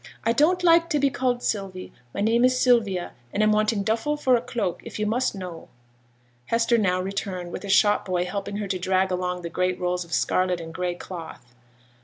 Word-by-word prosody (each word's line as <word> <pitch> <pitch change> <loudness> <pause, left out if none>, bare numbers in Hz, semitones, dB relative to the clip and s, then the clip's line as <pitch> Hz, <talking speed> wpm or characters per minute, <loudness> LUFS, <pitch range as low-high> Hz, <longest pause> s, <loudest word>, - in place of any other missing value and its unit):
'I 230 - +3
don't 350 +8 +3
like 335 -1 +5
to 300 - +1
be 280 -1 +2
called 245 -1 -1
"Sylvie;" 195 -3 -3 0.2
my - - -4
name 230 +3 +3
is 255 0 +3
Sylvia; 215 -9 +2 0.2
and 210 - +1
I'm 215 - +4
wanting 215 -1 +1
duffle 225 +8 0
for 260 -4 +3
a 235 - +1
cloak, 235 -7 -3
if - - -8
you 210 - -1
must 240 +2 0
know.' 180 -4 -8 0.8
Hester 230 0 +2
now 185 -3 +1
returned, 185 -2 -4
with - - -6
a - - -7
shop 205 +1 +4
boy 180 -1 0
helping 200 +2 -4
her 205 -1 -3
to 185 -1 -2
drag 190 +1 +1
along 180 0 -2
the 170 - -4
great 180 +1 0
rolls 180 0 -1
of 170 - -17
scarlet 180 +2 +1
and 165 -1 -8
gray 180 0 -2
cloth. 160 -9 -9
200 Hz, 210 wpm, -25 LUFS, 180-235 Hz, 0.8 s, like